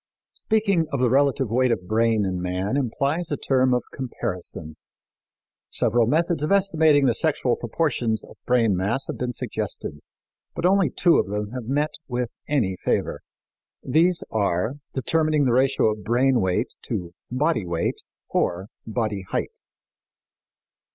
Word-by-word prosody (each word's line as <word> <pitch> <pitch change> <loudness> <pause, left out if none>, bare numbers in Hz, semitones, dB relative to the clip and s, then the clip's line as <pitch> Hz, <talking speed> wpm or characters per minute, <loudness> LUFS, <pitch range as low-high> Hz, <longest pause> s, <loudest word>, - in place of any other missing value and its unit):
Speaking 200 -7 +1
of 140 - -1
the 125 -2 +2
relative 135 -3 +2
weight 130 +2 +3
of 90 -6 -2
brain 110 -1 +2
in 90 -1 -2
man 90 +6 -1
implies 140 +5 -1
a 145 - 0
term 130 -1 +2
of 125 0 +2
comparison. 90 - -5 0.9
Several 115 0 +2
methods 165 +3 +1
of 150 - -1
estimating 160 -7 +4
the 120 - +4
sexual 130 -3 +1
proportions 120 -4 -1
of - - -14
brain 115 -5 +3
mass 105 +9 -1
have - - -6
been 125 0 -2
suggested, 75 -8 -4 0.6
but - - -2
only 195 0 +4
two 175 -2 +3
of - - 0
them 105 +1 -3
have 125 -2 -5
met 150 +3 +1 0.2
with 125 -2 -2 0.2
any 110 -11 0
favor. - - 0 0.6
These 170 +3 +2
are 105 +4 0 0.2
determining 155 +2 +1
the 125 - +2
ratio 130 -3 +3
of 105 -1 -6
brain 125 +1 +2
weight 95 +6 0
to 90 -8 -4 0.2
body 130 - 0
weight 85 -1 -1 0.3
or 95 +4 -1 0.2
body 110 -3 -2
height. - - -3
125 Hz, 145 wpm, -24 LUFS, 105-145 Hz, 0.9 s, estimating